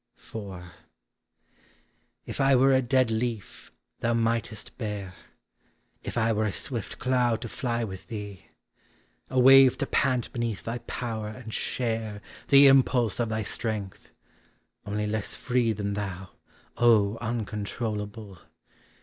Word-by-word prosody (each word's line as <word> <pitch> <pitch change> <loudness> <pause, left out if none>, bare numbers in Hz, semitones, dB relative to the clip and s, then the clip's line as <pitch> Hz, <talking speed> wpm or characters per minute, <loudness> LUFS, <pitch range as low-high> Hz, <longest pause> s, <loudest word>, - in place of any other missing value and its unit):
IV. 100 -5 -8 1.6
If - - -4
I 135 0 +5
were 135 +2 +5
a 130 - +4
dead 130 -1 +2
leaf 110 -2 -4 0.3
thou 120 0 +1
mightest 115 -1 -1
bear; 105 -5 -4 0.9
If - - -6
I 115 0 +2
were 110 0 0
a 105 - 0
swift 115 +2 -4
cloud 125 -3 +1
to - - -4
fly 120 -2 -2
with 95 -4 -7
thee; 105 -5 -7 0.8
A 130 - +1
wave 135 0 +8
to 140 - -1
pant 130 -3 0
beneath 115 -4 -3
thy 115 +2 -4
power 115 -3 -4
and 110 0 -8
share 110 -4 -2 0.3
The 140 0 +8
impulse 130 -5 +4
of 120 -2 0
thy 110 0 -1
strength 105 -3 -4 0.4
— - - -42
only 105 +1 -1
less 105 -1 -3
free 125 -2 +1
Than 100 -1 -3
thou, 95 -2 -5 0.5
(3 110 -3 +4
uncontrollable 105 -2 -4
115 Hz, 130 wpm, -27 LUFS, 105-125 Hz, 1.6 s, wave